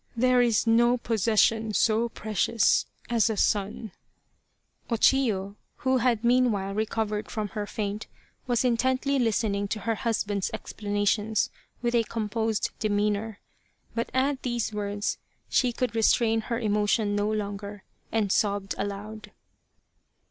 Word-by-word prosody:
There 250 +1 +4
is 235 -3 +2
no 240 +2 +4
possession 225 -1 +1
so 225 +4 +2
precious 215 0 +1 0.2
as 235 -1 +2
a 220 - -2
son." 210 +1 0 1.0
O 235 - +1
Chiyo, 210 -6 +2 0.3
who 260 0 +4
had 235 -2 +1
meanwhile 235 -5 +2
recovered 215 0 -2
from 215 -2 -3
her 205 0 -4
faint, 205 +1 -4 0.4
was 245 0 +1
intently 260 +3 +1
listening 210 -3 0
to 215 +1 -3
her 230 - 0
husband's 210 -4 -1
explana 205 -1 -3
tions 215 +1 +1 0.3
with 240 0 0
a 235 -1 +3
composed 225 0 -2
demeanour. 210 0 -1 0.5
But 230 - -2
at 265 +1 0
these 240 -3 -2
words 205 0 -2 0.3
she 250 -2 +2
could 245 -1 -2
restrain 225 0 +3
her 235 -1 0
emotion 210 -1 +1
no 205 +1 0
longer, 205 -1 -4 0.3
and 215 -3 +1
sobbed 200 -2 +1
aloud. 205 +2 -5
220 Hz, 130 wpm, -27 LUFS, 205-235 Hz, 1.0 s, There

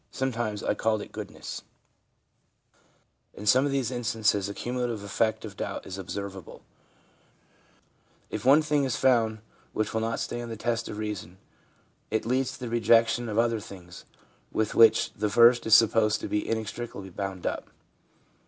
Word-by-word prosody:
Sometimes 120 -5 -2
I - - +1
called 110 -2 0
it - - -13
Goodness/ - - -7 1.7
In 105 - -8
some 130 +6 +5
of - - -2
these 135 -3 0
instances 110 -5 0
the 100 - -5
cumulative 120 -3 -3
effect 110 +2 0
of 105 -2 -9
doubt 95 0 -5
is 95 0 -7
observable; 95 0 -7 1.7
if 105 - -4
one 145 +4 +6
thing 150 -2 +1
is 130 -3 0
found 115 -4 +2 0.3
which 110 - -1
will 110 - 0
not 115 +1 -1
stand 120 0 -4
the 115 - -6
test 115 +1 -2
of 105 - -6
reason, 105 -4 -5 0.7
it 110 - -1
leads 130 +2 0
to - - -11
the 125 - -4
rejection 115 0 +3
of 105 - -3
other 115 -1 +2
things 90 -4 -11 0.5
with 110 -1 -1
which 115 -1 +5
the 105 - -1
first 120 +2 +5
is 110 - +8
supposed 110 -1 +4
to - - -4
be 105 - -2
inextricably 110 -2 -4
bound 95 -1 -5
up. - - -3
110 Hz, 160 wpm, -27 LUFS, 105-120 Hz, 1.7 s, is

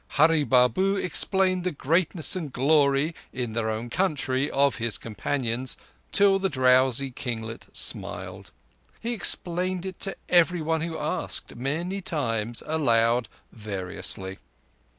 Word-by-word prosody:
Hurree 160 +1 +5
Babu 130 - +3
explained 185 0 +2
the 180 - -1
greatness 165 +3 +1
and 160 -6 -4
glory, 140 +3 +2 0.2
in 125 -3 -4
their 110 -1 -1
own 110 +2 -4
country, 145 -6 0
of 140 -3 +2
his 115 -2 -1
companions, 120 +2 -2 0.3
till 200 -1 +4
the 195 0 0
drowsy 130 -1 +3
kinglet 115 -3 -5
smiled. - - -2 0.5
He 235 +1 -3
explained 180 -2 +1
it 190 -2 -6
to 195 - -1
everyone 165 -2 +2
who 165 0 -3
asked—many 165 +10 -3
times—aloud—variously. 115 - -2
140 Hz, 110 wpm, -26 LUFS, 120-175 Hz, 0.5 s, Hurree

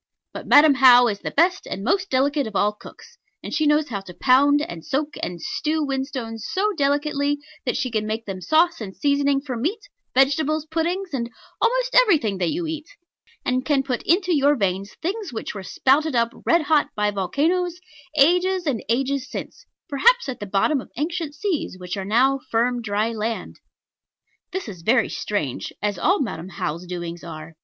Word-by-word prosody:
But - - -8
Madam 295 0 +7
How 250 -2 +7
is 200 -2 -3
the - - -4
best 355 +4 +2
and 195 - -5
most 375 - 0
delicate 280 +1 +1
of 215 - -9
all 205 +1 +3
cooks; 470 - -15 0.2
and - - -6
she 310 -2 +2
knows 295 0 +2
how 200 -4 -3
to 180 -2 -12
pound, 285 +3 +4
and 170 - -7
soak, 290 +2 -1
and 175 -1 -4
stew 310 - -1
whinstones 260 -5 -4
so 415 +3 0
delicately, 285 0 +1 0.3
that 245 - 0
she 255 -4 -2
can 215 -1 -1
make 220 +1 -3
them 190 -2 -6
sauce 320 - +2
and 190 -3 -7
seasoning 280 -1 +2
for 270 -3 -5
meat, 340 - -2 0.3
vegetables, 290 +3 +2
puddings, 340 +4 -2
and 235 -3 -2 0.3
almost - - +1
everything 310 - +4
that 175 -2 +1
you 345 +1 -2
eat; 315 0 -5 0.6
and 255 0 0
can 275 -1 +1
put 255 -3 -2
into 360 0 +2
your 290 0 +4
veins 195 -3 -2
things 395 +1 -3
which 225 - -5
were 205 - -6
spouted 275 - +1
up 235 0 +1
red 335 -1 +4
hot 295 -1 +3
by 210 0 +1
volcanos, 325 - 0 0.4
ages 360 +5 +3
and 260 -8 -1
ages 265 +2 0
since, - - -8 0.2
perhaps 470 - +3
at 260 -3 -5
the 205 - -6
bottom 210 +9 +1
of - - -14
ancient 320 0 -3
seas 320 - -2
which 180 +1 -5
are 195 -1 -4
now 260 +6 +3
firm 240 +2 +1
dry 215 +1 -1
land. 225 0 -4 0.9
This 380 -4 -4
is 185 -6 -8
very 230 +6 +2
strange 155 -12 -3
as 205 -3 -2
all 380 - +2
Madam 185 -8 -4
How's 170 0 -4
doings 175 -1 -6
are. 160 -1 -9
270 Hz, 185 wpm, -23 LUFS, 215-315 Hz, 0.9 s, Madam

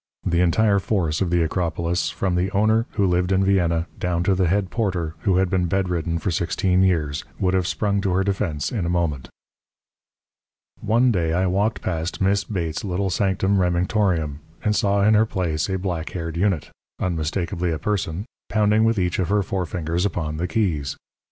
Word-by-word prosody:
The 85 +1 +2
entire 100 +4 +3
force 90 -6 -1
of 95 - +1
the 85 -1 +2
Acropolis, 85 +1 -1
from 95 -2 -2
the 90 +2 +1
owner, 110 +3 +2
who 100 - +1
lived 90 0 +1
in 95 0 +3
Vienna, 85 -4 +2
down 90 -3 0
to 95 - +3
the 95 -1 +2
head 95 +2 0
porter, 90 -8 -1
who 95 -4 +1
had 95 0 +3
been 90 -1 0
bedridden 85 -3 -1
for 85 +3 -2
sixteen 90 +2 +1
years, 80 -6 +1
would 90 -1 +1
have 95 -2 +1
sprung 100 -1 0
to 100 -2 0
her 95 +1 +2
defence 95 -7 -1
in 110 -7 -2
a 85 - -1
moment. 85 -7 -1 1.5
One 120 +4 +3
day 85 -6 0
I 90 +2 +2
walked 100 +4 0
past 85 0 -3
Miss 100 +1 +2
Bates's 85 -7 -3
little 95 0 -1
sanctum 95 +1 +1
Remingtorium, 90 -4 +1 0.2
and 105 0 +1
saw 100 -1 +2
in 110 - +5
her 110 +1 +4
place 85 -5 -1
a 95 - 0
black 90 -4 -3
haired 80 -2 -4
unit 85 -5 0 0.3
unmistakably 85 +1 -1
a 80 - -1
person 95 -1 -2 0.2
pounding 105 0 +3
with 115 0 +2
each 90 -1 0
of 90 -3 0
her 105 0 +2
forefingers 90 -3 -2
upon 80 -6 -2
the 90 +3 -1
keys. 80 -8 -1
90 Hz, 185 wpm, -23 LUFS, 85-100 Hz, 1.5 s, in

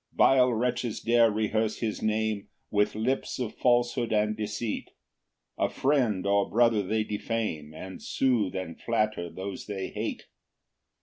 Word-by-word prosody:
2 - - -26
Vile 125 -1 +5
wretches 120 0 -1
dare 115 0 +4
rehearse 110 +1 0
his 110 -3 -3
name 110 -1 0 0.2
With 105 0 +2
lips 125 +5 -1
of 125 -4 -3
falsehood 120 -1 +2
and 105 0 +2
deceit; 110 +1 -3 0.7
A - - +2
friend 125 -9 +1
or 100 0 +2
brother 115 -1 +4
they 110 +3 0
defame, 105 -8 -3
And 95 +3 -8
soothe 120 -9 +1
and 95 -3 -5
flatter 110 -6 0
those 95 +3 -6
they 95 -2 -4
hate. - - -4
110 Hz, 140 wpm, -28 LUFS, 105-120 Hz, 0.7 s, Vile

